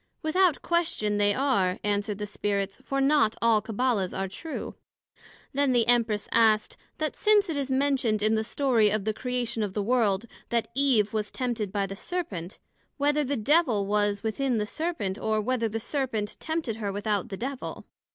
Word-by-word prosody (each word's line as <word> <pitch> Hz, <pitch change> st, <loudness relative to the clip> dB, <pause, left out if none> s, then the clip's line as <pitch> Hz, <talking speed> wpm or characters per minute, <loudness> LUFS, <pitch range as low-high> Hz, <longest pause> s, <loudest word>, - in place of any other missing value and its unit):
Without 345 Hz, +1 st, +2 dB
question, 265 Hz, -12 st, 0 dB
they 205 Hz, 0 st, +4 dB
are, 200 Hz, -8 st, +1 dB
answered 205 Hz, 0 st, -1 dB
the 210 Hz, -, -3 dB
Spirits; 200 Hz, -1 st, -2 dB
for 275 Hz, -, -2 dB
not 275 Hz, -5 st, +3 dB
all 230 Hz, -2 st, +3 dB
Cabbala's 220 Hz, -3 st, -1 dB
are 195 Hz, 0 st, -1 dB
true. 310 Hz, -, -6 dB, 0.8 s
Then 280 Hz, -1 st, +2 dB
the 235 Hz, -2 st, +3 dB
Empress 230 Hz, -4 st, +2 dB
asked, 220 Hz, -2 st, +3 dB, 0.2 s
That 310 Hz, -1 st, -2 dB
since 420 Hz, -3 st, +3 dB
it -, -, -2 dB
is 275 Hz, -1 st, -2 dB
mentioned 260 Hz, -6 st, +1 dB
in 215 Hz, +1 st, +3 dB
the 220 Hz, 0 st, +1 dB
story 235 Hz, -3 st, +2 dB
of 210 Hz, -1 st, -1 dB
the 215 Hz, -, 0 dB
Creation 250 Hz, -1 st, -2 dB
of 205 Hz, -3 st, -3 dB
the 205 Hz, -, 0 dB
World, 220 Hz, -3 st, +2 dB, 0.2 s
that 235 Hz, -1 st, 0 dB
Eve 250 Hz, -6 st, +3 dB
was 210 Hz, -1 st, -1 dB
tempted 235 Hz, -6 st, -2 dB
by 200 Hz, -1 st, 0 dB
the 195 Hz, 0 st, -6 dB
Serpent, 200 Hz, -, -5 dB, 0.4 s
Whether 295 Hz, +1 st, +2 dB
the 280 Hz, 0 st, -1 dB
Devil 235 Hz, -4 st, +2 dB
was 205 Hz, 0 st, 0 dB
within 240 Hz, +3 st, 0 dB
the 210 Hz, -, 0 dB
Serpent, 220 Hz, -, -3 dB
or, 220 Hz, 0 st, 0 dB
Whether 230 Hz, +1 st, 0 dB
the 225 Hz, +1 st, -3 dB
Serpent 230 Hz, -4 st, -2 dB
tempted 315 Hz, -9 st, -2 dB
her 205 Hz, -3 st, -2 dB
without 205 Hz, -1 st, -1 dB
the 195 Hz, -, -5 dB
Devil? 265 Hz, +4 st, -5 dB
225 Hz, 180 wpm, -27 LUFS, 205-275 Hz, 0.8 s, they